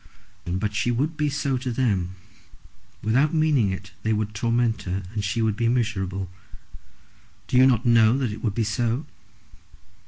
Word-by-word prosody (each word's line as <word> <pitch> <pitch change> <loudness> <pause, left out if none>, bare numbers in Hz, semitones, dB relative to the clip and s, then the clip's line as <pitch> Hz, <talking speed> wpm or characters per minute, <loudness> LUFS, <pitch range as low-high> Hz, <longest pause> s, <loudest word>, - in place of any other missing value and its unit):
"But 95 +4 -2
she 105 +4 0
would 140 +7 0
be 150 -1 0
so 140 -2 -1
to 130 -1 -3
them. 100 -7 0 0.9
Without 135 +9 +2
meaning 150 -10 +3
it 95 +1 -6
they 110 - 0
would 105 0 -2
torment 115 +1 0
her, 95 +1 -3
and 105 -2 -2
she 110 +4 0
would 110 -2 +1
be 115 +2 0
miserable. 95 -6 -1 1.2
Do - - -4
you 130 +1 +7
not 125 -4 +2
know 115 0 +5
that 130 -5 -1
it 105 - -8
would 105 -4 -1
be 115 - +1
so?" 115 +6 -1
115 Hz, 165 wpm, -24 LUFS, 105-125 Hz, 1.2 s, you